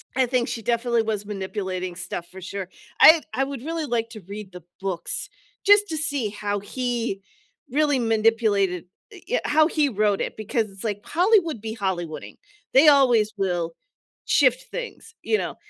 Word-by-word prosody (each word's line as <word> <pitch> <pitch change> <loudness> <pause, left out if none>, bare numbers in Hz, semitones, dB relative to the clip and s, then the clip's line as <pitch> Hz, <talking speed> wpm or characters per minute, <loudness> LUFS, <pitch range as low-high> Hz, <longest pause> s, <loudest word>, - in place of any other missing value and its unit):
I 260 0 +3
think 245 -1 0
she 230 - -4
definitely 235 +1 +1
was 215 -2 -2
manipulating 190 -3 -4
stuff 175 -1 -6
for 190 +1 -10
sure, 190 0 -6 0.3
I 320 0 +9
I 260 +4 +1
would 275 -2 -5
really 325 +1 -3
like 230 -3 -1
to 220 -2 -9
read 200 -1 -8
the 180 0 -11 0.2
books, 185 -4 -3 0.4
just 410 0 +6
to 320 - -2
see 285 -8 -1
how 205 0 -3
he 235 -1 -3 0.5
really 290 0 +2
manipulated 220 -5 +2 0.3
i 375 - -12
yeah, - - +1
how 310 +1 +4
he 305 -3 +1
wrote 210 -3 +1
it, - - -3
because 215 +1 -1
it's 195 0 -9
like 205 -2 -3
Hollywood 350 - +2
be 220 0 -5
Hollywooding, 180 -6 -4 0.4
they 275 +4 +7
always 245 -7 +5
will 175 -4 -1 0.5
shift - - +3
things, 475 -2 -7
you 435 - +2
know, - - -4
225 Hz, 170 wpm, -24 LUFS, 195-280 Hz, 0.5 s, I